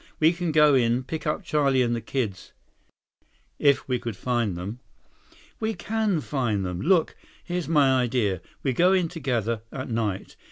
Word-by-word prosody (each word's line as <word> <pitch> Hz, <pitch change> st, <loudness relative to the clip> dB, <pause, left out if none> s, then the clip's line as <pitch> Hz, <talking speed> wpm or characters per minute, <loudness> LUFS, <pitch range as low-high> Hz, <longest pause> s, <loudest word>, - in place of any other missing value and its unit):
We 160 Hz, +2 st, +5 dB
can 175 Hz, -1 st, -2 dB
go 150 Hz, -1 st, +5 dB
in, 120 Hz, -1 st, +2 dB
pick 155 Hz, +3 st, -5 dB
up 150 Hz, -, -1 dB
Charlie 140 Hz, -4 st, +2 dB
and 120 Hz, -1 st, 0 dB
the 115 Hz, -, -3 dB
kids—" 110 Hz, -4 st, -4 dB, 1.1 s
"If 140 Hz, -2 st, +3 dB
we 125 Hz, -2 st, 0 dB
could 115 Hz, -3 st, -5 dB
find 120 Hz, -7 st, -1 dB
them." 100 Hz, +7 st, -6 dB, 0.8 s
"We 220 Hz, 0 st, -1 dB
can 215 Hz, -6 st, -1 dB
find 120 Hz, -10 st, -1 dB
them. 90 Hz, -1 st, -4 dB
Look, 175 Hz, 0 st, +2 dB, 0.3 s
here's 175 Hz, -1 st, -3 dB
my 140 Hz, -5 st, +4 dB
idea. 115 Hz, -7 st, 0 dB, 0.2 s
We 135 Hz, -, +1 dB
go 180 Hz, +8 st, +4 dB
in 180 Hz, -3 st, +2 dB
together. 120 Hz, -, -2 dB
At 130 Hz, -2 st, -6 dB
night. 105 Hz, -4 st, -2 dB
130 Hz, 165 wpm, -25 LUFS, 115-155 Hz, 1.1 s, We